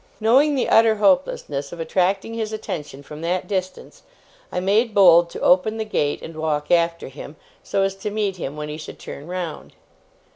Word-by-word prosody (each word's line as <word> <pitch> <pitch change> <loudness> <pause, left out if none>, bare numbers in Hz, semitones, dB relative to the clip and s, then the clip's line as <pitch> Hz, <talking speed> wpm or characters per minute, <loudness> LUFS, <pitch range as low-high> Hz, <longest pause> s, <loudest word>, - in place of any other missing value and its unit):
Knowing 265 +7 +4
the 260 - 0
utter 225 -1 +5
hopelessness 180 -8 +1
of 175 - -9
attracting 190 +6 0
his 220 -1 -3
attention 150 -10 -6
from 150 +2 -10
that 175 +2 -2
distance, 190 - -4 0.5
I - - -1
made 210 +5 +1
bold 175 -3 +6
to - - -8
open 200 +5 +3
the 220 - -2
gate, 145 -9 -1
and 160 - -8
walk 155 -2 -2
after 170 -1 +2
him, 145 +2 -10 0.3
so 195 - -1
as 195 0 0
to 195 - -4
meet 205 -2 -2
him 150 -3 -5
when 150 0 -5
he 150 0 -6
should 155 - -9
turn 140 +3 -9
round. 180 -3 -6
180 Hz, 185 wpm, -22 LUFS, 155-215 Hz, 0.5 s, bold